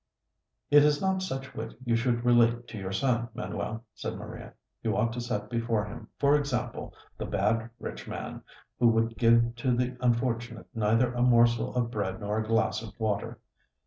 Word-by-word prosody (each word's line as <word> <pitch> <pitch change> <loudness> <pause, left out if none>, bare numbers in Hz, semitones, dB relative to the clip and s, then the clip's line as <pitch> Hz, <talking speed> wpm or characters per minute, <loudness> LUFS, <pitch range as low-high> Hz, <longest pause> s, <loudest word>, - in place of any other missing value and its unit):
"It 145 0 +8
is 150 -1 +3
not 190 -1 +1
such 135 -7 -4
wit 110 0 -6
you 120 -1 +2
should 120 0 0
relate 120 0 +4
to 110 - -7
your 95 -1 -4
son, 120 +2 0
Manuel," 110 +2 -4
said - - -5
Maria. - - -9 0.3
"You - - 0
ought 115 0 +1
to 120 - -4
set 105 -4 -3
before 115 -2 0
him, 105 - -9
for 140 0 +4
example, 125 -5 -2 0.2
the - - -3
bad 110 +4 0
rich - - -7
man, - - -6 0.4
who 120 - +5
would 115 0 +2
give 115 0 +4
to 125 +1 +1
the 125 +1 -1
unfortunate 120 -1 0
neither 115 +2 +2
a 120 - -1
morsel 120 -1 +4
of 120 -1 0
bread 100 -3 -2
nor 105 +1 -1
a 110 - -3
glass 110 -2 +1
of 110 -1 -10
water. 105 -2 -1
115 Hz, 180 wpm, -29 LUFS, 110-125 Hz, 0.4 s, It